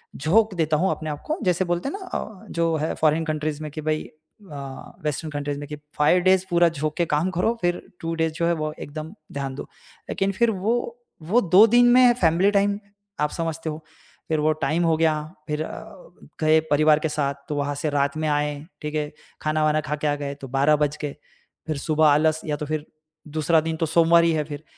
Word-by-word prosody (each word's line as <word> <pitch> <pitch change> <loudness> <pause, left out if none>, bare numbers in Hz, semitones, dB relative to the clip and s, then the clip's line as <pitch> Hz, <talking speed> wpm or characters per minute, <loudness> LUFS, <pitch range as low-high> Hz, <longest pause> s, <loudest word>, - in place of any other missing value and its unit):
झोंक 205 +8 +2
देता 155 -2 +1
हूँ 185 +5 +2
अपने 155 - -4
आप 145 -1 -5
को 310 +3 -1
जैसे 180 0 +1
बोलते 175 +8 -1
हैं - - -5
ना 380 - -9
अ, 205 -3 -9
जो 165 -1 +1
है 155 +1 -1
फ़ौरन 155 +1 +2
कन्ट्रीज 155 -1 -2
में 155 - -5
कि 155 +1 -6
भई 155 0 -1
अ, 155 -4 -11
वेस्टर्न 155 +1 -2
कन्ट्रीज 145 0 -3
में 145 - -7
कि 150 - -6 0.2
5 150 +5 +4
डेज़ 185 0 +4
पूरा 175 0 +4
झोंक 155 -1 -3
के 170 - +2
काम 165 +5 +1
करो 225 +6 +2
फ़िर 175 0 0 0.2
2 165 0 -3
डेज़ 160 -1 0
जो 170 +1 -1
है 170 - +3
वो 155 0 -2
एकदम 155 +3 -7 0.2
ध्यान 135 -2 -4
दो। - - -5 0.5
लेकिन 195 0 0
फ़िर 235 +3 +2
वो 210 +4 0 0.5
वो 195 +10 +2
2 190 +2 +7
दिन 240 +2 +5
में 250 -1 +7
फैमिली 175 +4 +4
टाइम 200 0 +2 0.4
आप 150 0 +1
समझते 165 -1 -3
हो। 155 +1 -6 0.5
फ़िर 155 - +1
वो 155 +1 +3
टाइम 155 -1 -2
दिन - - +2
हो 165 -1 +3
गया। 160 -1 +3 0.3
फ़िर 150 0 -2
अ, - - -10 0.3
गए 155 0 +4
परिवार 155 +1 +5
के 160 - -1
साथ 145 -2 -1 0.2
तो 150 - -2
वहाँ 145 0 -1
से 155 +2 -2
रात 145 +1 0
में 155 - -1
आए। 150 0 +1 0.3
ठीक 150 0 -4
है? 150 -1 -1 0.3
ख़ाना-वाना 155 0 +1
ख़ा 150 0 -3
के 150 0 -2
आ 145 - +1
गए 145 -1 -4
तो 135 - -6
12 140 +4 +3
बज 150 0 0
गए। 145 -2 -3 0.5
फ़िर 155 - -2
सुबह 155 +2 +2
आलस 155 +2 +3
या 150 -2 -1
तो 150 - -4
फ़िर 155 0 -3 0.5
दूसरा 160 +1 +3
दिन 160 0 -2
तो 165 - 0
सोमवार 170 +1 +5
ही 170 - +3
है 155 -1 0
फ़िर। 145 0 -8
155 Hz, 225 wpm, -24 LUFS, 150-170 Hz, 0.5 s, 2